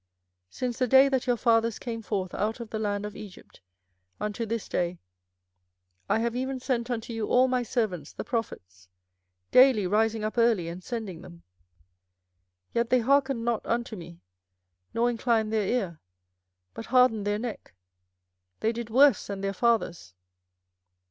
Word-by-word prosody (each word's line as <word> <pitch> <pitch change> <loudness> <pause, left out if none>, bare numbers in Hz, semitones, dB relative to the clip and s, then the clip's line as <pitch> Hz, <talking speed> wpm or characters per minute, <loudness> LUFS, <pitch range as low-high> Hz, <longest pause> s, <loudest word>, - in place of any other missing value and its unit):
24:007:025 - - -18
Since 245 -2 -3
the 255 - +2
day 265 +3 +6
that 265 -2 -1
your 245 -1 +2
fathers 230 -1 +2
came 230 -2 -5
forth 185 -3 -3
out 220 +3 -2
of 235 -2 -8
the 220 - -3
land 205 -1 -2
of 210 - -7
Egypt 195 - -12 0.6
unto 210 +2 -3
this 225 0 -3
day 175 0 -1 1.1
I - - +3
have 235 +1 -1
even 260 +1 -2
sent 245 -2 -2
unto 235 -1 -3
you 225 -2 -2
all 255 +1 +4
my 255 -1 +1
servants 215 - -2
the - - -6
prophets, 95 - -5 0.6
daily 255 -6 +6
rising 220 +3 +1
up 215 +3 -2
early 225 -8 +3
and 175 +2 -8
sending 215 -8 -5
them: 170 -1 -13 1.3
24:007:026 - - -41
Yet 235 0 0
they 255 - +4
hearkened 270 -1 +2
not 235 -2 0
unto 235 0 -2
me, 170 -2 -11 0.7
nor 235 +1 +1
inclined 230 -2 0
their 215 -3 +1
ear, 195 -10 -1 0.7
but 225 - -8
hardened 250 -5 +3
their 205 0 +1
neck: 220 - -7 0.9
they 220 - +2
did 235 -1 -6
worse 265 -1 +5
than 200 -1 -5
their 195 0 -1
fathers. 195 - 0
225 Hz, 160 wpm, -27 LUFS, 205-240 Hz, 1.3 s, day